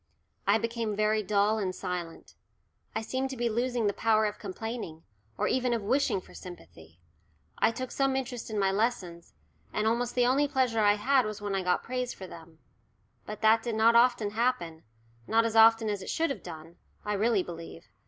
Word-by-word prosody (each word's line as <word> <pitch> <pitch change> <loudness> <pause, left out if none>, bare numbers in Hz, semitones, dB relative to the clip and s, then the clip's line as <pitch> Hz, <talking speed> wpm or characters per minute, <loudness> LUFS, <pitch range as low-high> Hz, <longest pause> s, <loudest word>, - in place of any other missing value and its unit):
I 200 +2 +5
became 230 -1 -2
very 215 +1 +2
dull 210 +2 +1
and 185 -3 -2
silent. 180 -3 -6 0.6
I 220 - -1
seemed 260 +4 -2
to 265 - -6
be 240 0 0
losing 240 0 -1
the 200 - +1
power 220 0 +2
of 210 0 -3
complaining, 205 -5 -6 0.3
or - - 0
even 250 -1 +1
of 225 - -4
wishing 255 -1 +1
for - - -17
sympathy. 85 - -12 0.6
I - - +4
took 255 +2 -5
some 270 -1 +1
interest 250 -3 -4
in 215 - -4
my 195 -1 +2
lessons, 195 -5 -2 0.4
and 215 - -1
almost 235 +2 0
the 245 -1 +3
only 275 +4 +3
pleasure 255 -5 +1
I 205 -1 +5
had 260 +5 +3
was 215 0 -5
when 205 -1 -4
I 195 - 0
got 180 -1 0
praise 250 0 -3
for 190 - -9
them. 165 -2 -13 0.7
But 210 0 -7
that 220 +1 +5
did 235 -1 -3
not 225 +1 +4
often 235 -3 +4
happen, 215 -9 -1 0.5
not 230 +1 +3
as 225 -1 -2
often 225 0 +6
as 205 -2 -2
it - - -7
should 325 -2 0
have 240 - -5
done, 165 0 -10 0.3
I 210 - -1
really 210 -1 +2
believe. 165 - -9
220 Hz, 195 wpm, -29 LUFS, 195-240 Hz, 0.7 s, often